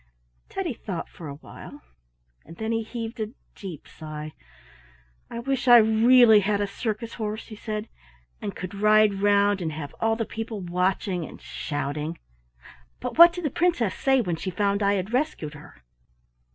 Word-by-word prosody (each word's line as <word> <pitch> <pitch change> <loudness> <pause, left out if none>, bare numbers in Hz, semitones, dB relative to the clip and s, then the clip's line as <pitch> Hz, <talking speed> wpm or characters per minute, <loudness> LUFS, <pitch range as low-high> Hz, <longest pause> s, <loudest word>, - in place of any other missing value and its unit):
Teddy - - -3
thought - - -5
for 165 - -10
a 140 - -6
while 145 - -12 0.6
and 165 +2 -13
then 220 0 -2
he 225 0 +1
heaved 230 +1 -6
a 215 +1 -3 0.2
deep 185 -8 -9
sigh. 155 -1 -8 1.0
"I - - -6
wish 260 +2 -2
I 240 -1 +10
really 225 0 +6
had 205 +1 0
a 205 - +1
circus 220 +3 -4
horse," 215 0 -5
he 215 - -8
said, 215 0 -5 0.5
"and 200 - -4
could 185 0 -6
ride 210 -1 +4
round 205 -1 +3
and 160 -2 -2
have 150 -2 -6
all 225 0 +2
the 225 0 -2
people 225 -1 -5
watching 180 0 -1
and - - -9
shouting. 145 - -4 0.8
But - - -5
what 340 0 +11
did 350 -1 -6
the 295 - 0
Princess 290 - +1
say 265 -1 +2
when 175 -7 -2
she 180 +4 -4
found 200 +2 0
I 200 0 +3
had 195 +4 -3
rescued 250 - -1
her?" 150 - -14
205 Hz, 170 wpm, -25 LUFS, 175-225 Hz, 1.0 s, what